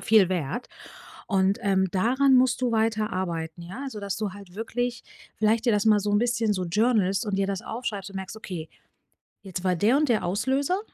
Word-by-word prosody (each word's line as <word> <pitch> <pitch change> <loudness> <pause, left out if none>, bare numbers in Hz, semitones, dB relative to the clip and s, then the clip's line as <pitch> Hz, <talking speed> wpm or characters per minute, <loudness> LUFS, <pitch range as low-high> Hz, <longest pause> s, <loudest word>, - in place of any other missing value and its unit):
viel 215 -4 +5
wert. 180 - -2 0.6
Und, 195 -1 +2
ähm, 190 -2 +2
daran 260 +8 +3
musst 255 0 +4
du 250 - +1
weiter 220 -1 +1
arbeiten, 170 -3 -3
ja? 190 +10 -7
Also, 260 -6 -6
dass 200 -1 -3
du 210 -3 -2
halt 200 -3 -13
wirklich 240 +2 -3 0.3
vielleicht 220 +2 +2
dir 235 - +4
das 210 +1 +1
mal 210 -1 +6
so 205 +1 -2
'n 205 - +3
bisschen 230 -2 +1
so 185 -2 -2
journalst 200 0 +2
und 200 -2 -1
dir 195 - +1
das 195 +2 -3
aufschreibst 215 -5 -5
und 195 - -8
merkst: 190 +3 -6
„Okay, 175 -7 -6 0.7
jetzt 185 -2 -6
war 185 -1 +2
der 215 +10 +3
und 300 0 +2
der 225 -3 +2
Auslöser. 265 - 0
210 Hz, 205 wpm, -26 LUFS, 190-235 Hz, 0.7 s, mal